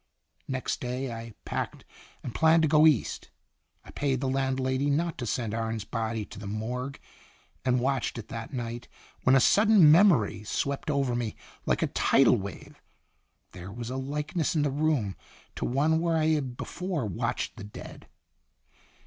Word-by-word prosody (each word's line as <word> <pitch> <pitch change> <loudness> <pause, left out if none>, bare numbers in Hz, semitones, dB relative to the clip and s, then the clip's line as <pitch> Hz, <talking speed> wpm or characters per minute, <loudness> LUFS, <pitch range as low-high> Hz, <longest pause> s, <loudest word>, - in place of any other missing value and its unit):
Next 130 -1 -2
day 125 0 -3
I 115 -1 -8
packed - - -4 0.4
and 120 - -5
planned 160 0 +4
to - - +4
go 155 +1 +6
East. 150 -7 +1 0.6
I - - -12
paid 135 -3 -1
the 135 - -2
landlady 130 +1 0
not 165 +4 0
to 120 - -3
send 115 -1 -2
Arne's 115 -1 -2
body 110 0 -3
to - - -11
the 100 - -7
morgue, 125 +6 -4 0.6
and 125 -1 +2
watched 130 -1 -1
it 115 -2 -7
that 115 +2 -6
night, 120 -2 -5 0.4
when 130 - +6
a - - +7
sudden 205 - +6
memory 155 - +4
swept 140 +7 -2
over 140 -4 +1
me 120 -3 -2 0.3
like - - +2
a - - -2
tidal 135 -2 +4
wave. 100 -3 -8 0.7
There 95 +1 -9
was 120 +3 -6
a - - -3
likeness 150 +5 -2
in 150 - +2
the 145 - +1
room 140 -9 0 0.4
to - - -3
one 150 +6 +2
where 165 -1 +1
I 155 0 +2
had 135 -6 -1
before 180 - -3
watched 95 -5 -3
the - - -8
dead. 105 - -10
130 Hz, 165 wpm, -28 LUFS, 115-150 Hz, 0.7 s, a